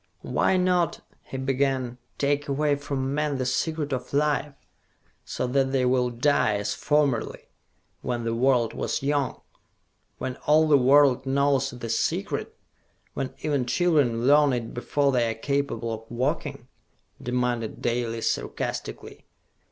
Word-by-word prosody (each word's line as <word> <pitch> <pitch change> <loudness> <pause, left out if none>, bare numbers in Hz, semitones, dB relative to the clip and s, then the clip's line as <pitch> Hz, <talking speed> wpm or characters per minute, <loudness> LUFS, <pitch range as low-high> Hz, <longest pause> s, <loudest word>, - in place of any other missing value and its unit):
"Why 190 - +1
not," 180 -2 +1 0.2
he 135 - -6
began, 130 -2 -1 0.2
"take 145 +1 0
away 145 +1 +1
from 140 -1 -3
men 150 -1 0
the 130 - -2
Secret 150 +3 -1
of 125 +1 -5
Life, 145 -1 +1 0.7
so - - -3
that 135 +1 +1
they 130 -2 +1
will 125 0 +2
die, 120 -3 +2
as 105 0 -2
formerly, 145 -6 0 0.5
when 120 -1 -2
the 115 0 -1
world 120 -1 +2
was - - -2
young?" 140 -1 -1 0.8
"When 130 -1 -4
all 155 +1 +5
the 150 - +5
world 135 0 +4
knows 140 0 +2
the 120 -1 -7
Secret, 115 - -2 0.6
when 135 -2 -4
even 145 -5 0
children 130 -6 +2
learn 145 0 +5
it 115 -2 -3
before 140 +3 0
they 120 -3 +2
are 115 - -3
capable 140 -3 -2
of 110 0 -8
walking?" 140 +1 -2 0.5
demanded 125 -2 -2
Dalis 115 -1 -1
sarcastically. - - -5
135 Hz, 135 wpm, -25 LUFS, 125-145 Hz, 0.8 s, all